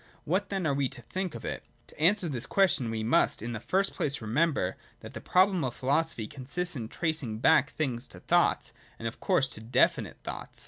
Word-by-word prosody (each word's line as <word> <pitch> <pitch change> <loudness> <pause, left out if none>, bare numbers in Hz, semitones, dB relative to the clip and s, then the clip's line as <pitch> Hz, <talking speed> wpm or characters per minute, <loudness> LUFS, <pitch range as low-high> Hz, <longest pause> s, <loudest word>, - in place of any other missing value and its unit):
What, 185 +6 0
then, 195 -3 -2
are 145 - +2
we 135 -2 0
to 135 -2 -10
think 185 - -4
of - - -7
it - - -4
.' - - -36
To - - -17
answer 180 +3 +3
this 130 -4 -3
question, 180 - +2
we 110 -1 -2
must, 110 -1 +2
in 120 +1 -3
the 115 - -4
first 195 - 0
place, 140 0 -1
remember 120 - +1 0.3
that - - -10
the - - -6
problem 185 -2 +3
of 125 -2 -2
philosophy 140 -3 0
consists 150 +9 -4
in 115 -4 -4
tracing 155 -7 -2
back 130 +5 +4
things 125 -6 -2
to - - -12
thoughts, - - +2 0.2
and, 115 - -4
of 115 - -6
course, 180 -9 +2
to 110 - -7
definite 115 +3 +1
thoughts. - - -7
140 Hz, 215 wpm, -29 LUFS, 120-175 Hz, 0.3 s, back